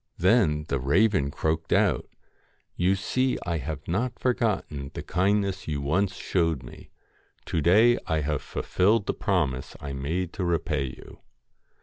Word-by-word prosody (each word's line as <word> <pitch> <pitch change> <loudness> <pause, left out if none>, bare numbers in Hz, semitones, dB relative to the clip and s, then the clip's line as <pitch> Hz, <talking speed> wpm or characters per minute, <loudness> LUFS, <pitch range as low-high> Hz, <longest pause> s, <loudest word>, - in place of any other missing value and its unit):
Then 85 -6 +3
the 70 - -1
raven 85 - +2
croaked 80 +2 -2
out - - +2 0.7
'You 90 +2 +2
see 130 +6 0
I 85 -2 -1
have 75 +1 -6
not 115 +8 -1
forgotten 105 - -1
the - - -5
kindness 100 +2 0
you 75 -2 -2
once 90 +8 0
showed 80 -7 0
me. - - -12 0.6
To 80 - -1
day 110 +9 +5
I 80 -1 +1
have 75 -1 -1
fulfilled 100 +3 +1
the - - -1
promise 75 - -1
I 70 -1 -6
made 80 +7 -3
to 95 - -3
repay 85 -5 0
you.' 65 - -10
85 Hz, 145 wpm, -26 LUFS, 75-100 Hz, 0.7 s, day